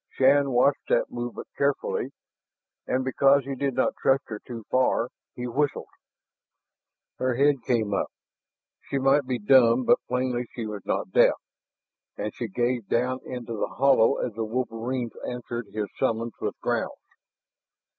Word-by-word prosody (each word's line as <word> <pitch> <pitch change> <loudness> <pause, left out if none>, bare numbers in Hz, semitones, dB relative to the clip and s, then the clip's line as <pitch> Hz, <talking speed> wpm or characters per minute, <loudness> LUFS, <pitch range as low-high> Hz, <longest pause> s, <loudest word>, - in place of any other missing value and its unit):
Shann 140 +1 +4
watched 130 +3 +2
that - - +2
movement 120 0 -5
carefully. 140 0 0 0.8
And 130 +1 0
because 135 +1 +4
he 135 - -3
did 135 -1 -2
not 130 - +2
trust 135 0 +3
her 105 -2 -5
too 115 -1 -8
far, 130 -2 +2 0.3
he 125 - -5
whistled. 140 +4 -1 1.3
Her 130 -1 +1
head 140 0 +3
came 110 -4 0
up. - - 0 0.8
She 140 - 0
might 135 +1 +3
be 130 -1 0
dumb, 120 +2 +5
but - - +4
plainly 125 -1 -1
she 115 - -4
was 105 -2 -6
not - - -1
deaf. - - +5 0.8
And 105 +1 -3
she 120 - -4
gazed 120 +1 -1
down 125 +2 +1
into 120 -2 -5
the - - -1
hollow 135 -1 +5
as 120 - -2
the 115 +2 -3
wolverines 120 +1 -3 0.2
answered 120 -2 -5
his 105 -1 -2
summons 115 -3 0
with - - -3
growls. - - -1
125 Hz, 150 wpm, -26 LUFS, 115-135 Hz, 1.3 s, dumb